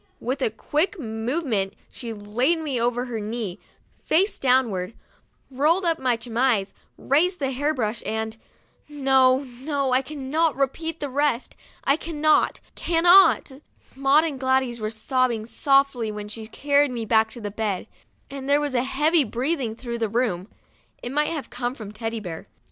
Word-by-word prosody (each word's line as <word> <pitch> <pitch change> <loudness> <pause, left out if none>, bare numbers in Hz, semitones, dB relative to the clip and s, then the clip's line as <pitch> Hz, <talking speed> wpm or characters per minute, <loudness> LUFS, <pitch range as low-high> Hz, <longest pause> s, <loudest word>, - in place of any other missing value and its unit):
With 260 +4 -3
a 255 - +2
quick 305 - -1
move 240 +6 -3
ment 200 -6 -1 0.2
she 235 -3 -7
laid 225 +9 0
me 285 -7 -2
over 245 +1 0
her 235 -3 -4
knee, 210 -3 -4 0.4
face 380 +6 +2
downward, 235 -7 +1 0.6
rolled 310 +8 +2
up 330 -1 +1
my 250 -3 +1
chemise, 230 -4 0 0.2
raised 355 +7 +2
the 270 -4 -1
hair 285 +4 0
brush, 230 -6 -2
and 220 0 -3 0.5
no, 265 -2 +3
no, 270 +2 -3
I 255 - +4
cannot 300 +3 -1
repeat 320 +4 -2
the 285 - -2
rest, 280 -2 0 0.3
I 275 - +3
cannot, 310 -2 +1
cannot. 345 -1 +5 0.4
Maud 275 +3 +4
and 300 -5 -3
Gladys 260 -2 +1
were 215 0 -2
sobbing 230 0 0
softly 275 -2 +2
when 210 0 -6
she 220 +1 -8
carried 285 +4 +2
me 235 -3 -4
back 220 0 +3
to 210 -4 -6
bed, 205 -3 -2 0.4
and 275 0 -7
there 285 +1 +5
was 290 -2 -2
a 245 - +2
heavy 300 +5 +2
breathing 250 0 -2
through 235 -1 -5
the 225 -2 0
room; 210 -5 -1 0.6
it 245 - -4
might 295 +2 +1
have 300 -7 -5
come 245 +1 -3
from 215 -6 -8
Teddy 225 +1 -4
Bear. 175 -6 -7
255 Hz, 160 wpm, -24 LUFS, 225-290 Hz, 0.6 s, cannot